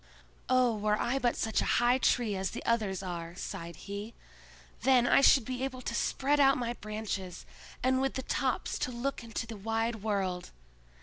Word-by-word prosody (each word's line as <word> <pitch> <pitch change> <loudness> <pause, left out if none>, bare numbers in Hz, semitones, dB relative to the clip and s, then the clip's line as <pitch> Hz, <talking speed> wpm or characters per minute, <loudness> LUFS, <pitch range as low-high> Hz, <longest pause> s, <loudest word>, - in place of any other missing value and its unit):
"Oh, 255 -2 +4
were 210 0 0
I 255 +3 0
but 240 -2 +1
such 220 - 0
a - - +2
high 240 +2 +4
tree 235 -6 +2
as 190 -1 -1
the - - -7
others 210 -5 0
are," 170 -2 -5
sighed 170 -2 -6
he. 205 +6 -7 0.7
"Then 250 0 +4
I 245 - +5
should 265 -3 +6
be 255 +1 -3
able 260 -1 -4
to 235 - -3
spread 280 +4 +1
out 275 -1 +5
my 240 -1 -2
branches, 210 -5 -5 0.4
and 260 +1 +3
with 270 0 0
the 260 - -3
tops - - -1
to 250 - -1
look 245 +1 -3
into 230 0 -4
the 225 0 -8
wide 225 +2 -1
world! 195 -4 -2
230 Hz, 185 wpm, -31 LUFS, 200-255 Hz, 0.7 s, should